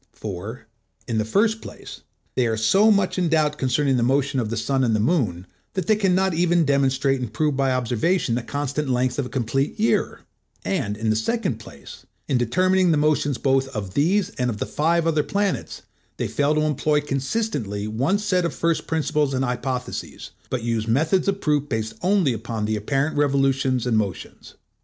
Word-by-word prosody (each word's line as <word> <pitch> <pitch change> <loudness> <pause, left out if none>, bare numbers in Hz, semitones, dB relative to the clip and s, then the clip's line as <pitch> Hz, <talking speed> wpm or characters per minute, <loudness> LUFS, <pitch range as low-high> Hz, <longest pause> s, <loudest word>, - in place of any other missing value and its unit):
For, 105 +3 -7 0.4
in 115 -3 0
the 110 - 0
first 220 - +1
place, - - -10 0.3
they 125 -2 +1
are 110 -1 -1
so 195 - +4
much 200 -3 +2
in 175 -2 +1
doubt 150 -2 +1
concerning 135 0 +1
the - - +1
motion 135 +2 +1
of 115 -3 -2
the 115 - -3
sun 130 +4 0
and 115 -3 +2
the - - +1
moon, 105 - 0 0.3
that 185 -3 -1
they 215 - +4
can 195 -4 +2
not 190 -1 +2
even 170 0 +2
demonstrate 135 -1 +2
and 125 -4 -4
prove 150 +4 0
by 135 -1 +1
observation 125 - 0
the 120 - 0
constant 145 +3 -3
length 125 +1 0
of 130 - -1
a - - -11
complete 135 - -1
year; 220 - +1 0.4
and 105 - -1
in 110 0 0
the - - +1
second 140 - -1
place, 70 -10 -12 0.2
in 130 - +1
determining 185 +9 +2
the 160 - +3
motions 145 -2 +1
both 135 0 +1
of 100 -3 -4
these 180 - +2
and 125 0 +1
of 110 - -3
the - - -2
five 165 +2 +1
other 160 -2 +2
planets, 200 +4 -2 0.3
they - - -1
fail 145 +1 +1
to 155 - +2
employ 150 0 +1
consistently 135 - -2
one 130 - +1
set 200 -3 0
of 170 - -2
first 165 -1 0
principles 150 -3 0
and 130 +1 0
hypotheses, 125 0 -4 0.2
but 125 -3 -2
use 115 -1 -1
methods 155 - +2
of 195 0 0
proof 145 -1 0
based 110 0 -2
only 185 -7 +2
upon 115 -1 -4
the 110 0 0
apparent 135 +8 -1
revolutions 135 -3 +1
and 115 -3 +2
motions. 100 -5 -6
135 Hz, 195 wpm, -23 LUFS, 120-165 Hz, 0.4 s, so